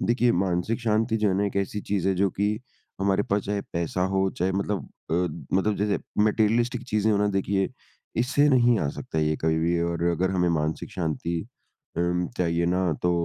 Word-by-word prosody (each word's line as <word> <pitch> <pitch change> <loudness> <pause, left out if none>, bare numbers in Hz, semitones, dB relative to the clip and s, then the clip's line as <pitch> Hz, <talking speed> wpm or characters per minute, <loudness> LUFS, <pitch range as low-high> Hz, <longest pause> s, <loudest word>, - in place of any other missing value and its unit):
देखिए 120 0 +3
मानसिक 95 +6 -1
शांति 110 0 +1
जो 105 -1 +2
है 95 - +1
ना 100 - +1
एक 100 - -4
ऐसी 100 +1 -1
चीज़ 95 -2 +1
है 95 - +2
जो 95 +1 +2
कि 100 +3 0 0.5
हमारे 95 0 +2
पास 100 0 0
चाहे 100 0 -1
पैसा 85 +1 -1
हो 95 0 +3
चाहे 95 +2 +1
मतलब 100 +1 -2 0.2
अ, - - +2 0.4
मतलब 105 +2 +1
जैसे 105 0 +1 0.2
मटेरियलिस्टिक 115 +3 +2
चीज़ें 110 +1 +2
हो - - +3
ना 105 - +2
देखिए, 95 0 0 0.5
इससे 140 +5 +3
नहीं 120 -4 +4
आ 70 - 0
सकता 80 - -5
ये 75 0 +2
कभी 80 0 +1
भी 85 +1 +1
और 85 0 -1
अगर 90 +2 0
हमें 90 -2 +1
मानसिक 80 -1 -1
शांति 85 0 -2 0.6
उम, 90 0 +1
चाहिए 85 -1 +1
ना 90 -1 +1
तो 90 - +3
95 Hz, 195 wpm, -26 LUFS, 85-105 Hz, 0.6 s, नहीं